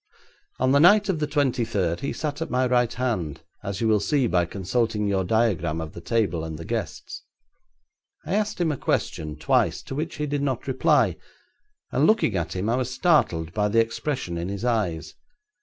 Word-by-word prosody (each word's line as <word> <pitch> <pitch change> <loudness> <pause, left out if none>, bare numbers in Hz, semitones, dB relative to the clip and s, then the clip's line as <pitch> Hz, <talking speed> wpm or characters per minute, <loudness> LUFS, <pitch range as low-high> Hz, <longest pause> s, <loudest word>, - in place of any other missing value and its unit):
On 130 +1 +2
the 140 - +5
night 205 +6 +6
of 175 -5 0
the 150 - 0
twenty 135 -5 +1
third 95 -7 -1
he 140 - -3
sat 150 0 -4
at 165 - -3
my 130 +1 +1
right 125 -2 +2
hand, 110 - -2 0.2
as 100 0 -4
you 115 - +2
will 110 -1 +4
see 140 +5 +1
by 90 -6 +2
consulting 105 +3 -1
your 100 -2 +1
diagram 90 -6 +1
of 80 -1 -6
the 85 - -9
table 100 -5 0
and 80 -1 -5
the 85 - -8
guests. - - -5 1.0
I - - -3
asked 210 -1 0
him 170 -3 +2
a 145 - -3
question 75 -9 -2
twice, 75 - +1
to - - -7
which 155 +4 -3
he 150 - -2
did 145 -1 -2
not 135 -3 -2
reply, 130 -1 +2 0.7
and - - +3
looking 215 - +3
at 85 -1 -2
him 95 +3 -2
I 120 +2 +1
was 130 -1 -2
startled 95 - +2
by 105 -1 +1
the 110 +2 +2
expression 115 - -2
in 85 +2 -3
his 100 +4 -4
eyes. 105 -9 -1
115 Hz, 200 wpm, -25 LUFS, 90-140 Hz, 1.0 s, night